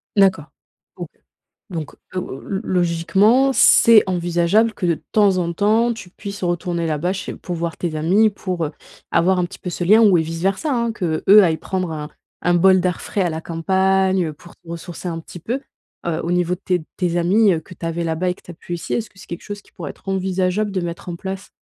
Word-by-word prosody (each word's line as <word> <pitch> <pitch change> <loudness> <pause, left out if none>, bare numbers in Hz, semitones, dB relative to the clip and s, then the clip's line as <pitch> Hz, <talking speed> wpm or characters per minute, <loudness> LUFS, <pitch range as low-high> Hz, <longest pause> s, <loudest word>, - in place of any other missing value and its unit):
D'accord 190 -6 +3 0.5
OK, - - -6 0.6
donc 160 -5 -5 0.2
o - - -1
lo 135 - -7 0.2
logiquement 190 +9 +3
c'est 230 -4 +7
envisageable 175 +5 +2
que 185 - -3
de 170 - +3 0.2
temps 200 -3 +4
en 170 -1 -1
temps 220 +6 +2
tu 210 -5 -10
puisses 200 +1 -8
retourner 175 -1 -1
là-bas 160 +3 -1
chez 195 -1 -5
pour 180 - -6
voir 170 0 -3
tes 165 -3 -3
amis, 190 +8 +3
pour, 185 -4 -3
heu, 150 - -7 0.4
avoir 180 +2 +3
un 180 - +2
petit 175 - -8
peu - - -6
ce 175 - -3
lien, 210 +6 +6
ou 205 -5 +6
et 165 - +2
vice 165 +1 -5
versa, 195 - 0
hein, 235 -2 0
qu'eux 170 -8 -2 0.2
aillent 165 -4 +2
prendre 185 -2 -3
un 150 -1 -5 0.4
un 175 - +3
bol 185 +2 +5
d'air 180 -1 -1
frais 205 - -3
à 175 - 0
la 160 0 -4
campagne, 190 +3 +1
heu, 155 - -4
pour 170 +3 -16
se - - -17
ressourcer 170 +1 -7
un 165 -1 -4
petit 170 - -11
peu. 240 - -3 0.5
Heu, 165 -1 -1
au 170 - -1
niveau 180 0 +1
de 180 - -14
tes 180 -2 +1
de - - -13
tes 175 -2 0
amis, 195 +4 +4
heu, 165 - -1
que 170 - -16
tu 165 - -6
avais 165 +1 -2
là-bas 165 +3 0
et - - -2
que - - -22
tu - - -12
as - - -8
plus 175 +1 -7
ici, 170 - -4
est-ce 230 -2 -2
que - - -31
c'est - - -13
quelque 170 - -6
chose 205 -1 -7
qui - - -25
pourrait 165 -6 -7
être - - -14
envisageable 190 +2 0
de 190 - -1
mettre 170 0 -6
en 175 - -3
place? 190 +2 -6
180 Hz, 235 wpm, -20 LUFS, 170-195 Hz, 0.6 s, c'est